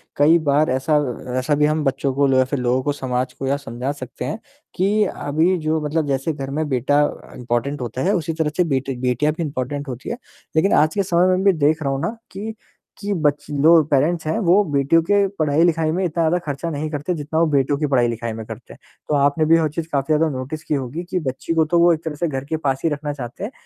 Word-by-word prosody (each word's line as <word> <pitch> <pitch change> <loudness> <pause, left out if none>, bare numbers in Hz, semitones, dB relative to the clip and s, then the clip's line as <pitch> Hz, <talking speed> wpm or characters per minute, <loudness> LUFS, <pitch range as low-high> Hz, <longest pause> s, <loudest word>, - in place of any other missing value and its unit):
कई 155 +4 +5
बार 150 +2 +3
ऐसा 135 +4 +1
अ, 125 -3 -3
ऐसा 145 +3 +1
भी 150 +1 +3
हम 155 +1 +1
बच्चों 135 -1 0
को 140 +1 +2
लो 135 -1 +3
या 130 - +4
फिर 135 +1 -3
लोगों 125 +1 +1
को, 145 - 0
समाज 125 -2 -2
को, 135 - -5
या 140 +1 +1
समझा 130 -1 -4
सकते 130 -3 -7
हैं 220 - -4 0.4
कि 205 +3 +2
अभी 165 +2 0
जो 160 -1 0
मतलब 150 +1 -1
जैसे 135 +3 -1
घर 135 -2 -6
में 155 +2 -1
बेटा 135 +3 +2 0.3
इम्पोर्टेंट 125 +4 -2
होता 125 +1 -4
है, 195 +7 +2
उसी 165 -2 -1
तरह 160 -1 0
से 180 - +4
बेटी 135 0 -1
बेटियाँ 130 +4 +1
भी 170 +2 -3
इम्पोर्टेंट 145 0 -4
होती 125 -1 -6
हैं। 235 - -3 0.4
लेकिन 160 +5 +3
आज 155 +1 +4
के 200 - +2
समय 180 -1 +2
में 185 - -1
भी 195 -1 +5
देख 155 +1 +2
रहा 140 - 0
हूँ 135 - -2
ना, 230 - -3
कि 210 +4 -5 0.4
कि 205 0 -3
बच्चे 150 -3 -1
लो 165 +2 +7
पैरेंट्स 155 +5 +2
हैं, 160 - 0
वो 195 0 +4
बेटियों 140 +4 +3
के 200 +3 +3
पढ़ाई-लिखाई 160 +1 +2
में 185 +3 -1
इतना 170 -1 -1
ज़्यादा 165 +2 +2
ख़र्चा 145 +3 -3
नहीं 155 0 -3
करते, 150 +4 -2
जितना 155 0 -2
वो 165 - +4
बेटों 140 0 +2
की 150 - -1
पढ़ाई-लिखाई 115 -2 +1
में 110 0 -7
करते 110 +2 -10
हैं। - - -17 0.3
तो 150 - +2
आपने 145 +2 +2
भी 165 +1 +5
हो 160 -1 +2
चीज 160 +2 -5
काफ़ी 140 +2 +1
ज़्यादा 160 +1 +3
नोटिस 145 +5 -6
की - - -2
होगी 140 +4 -3
कि 185 - 0
बच्ची 130 +1 -3
को 160 -1 +3
तो 170 - +4
वो 170 0 +6
एक 160 0 -4
तरह 160 -2 -4
से 170 +3 -1
घर 135 -2 -4
के 160 - 0
पास 135 -4 -1
ही 165 - +3
रखना 145 0 -3
चाहते 125 +3 -7
हैं, 210 - -4
150 Hz, 250 wpm, -21 LUFS, 135-165 Hz, 0.4 s, लो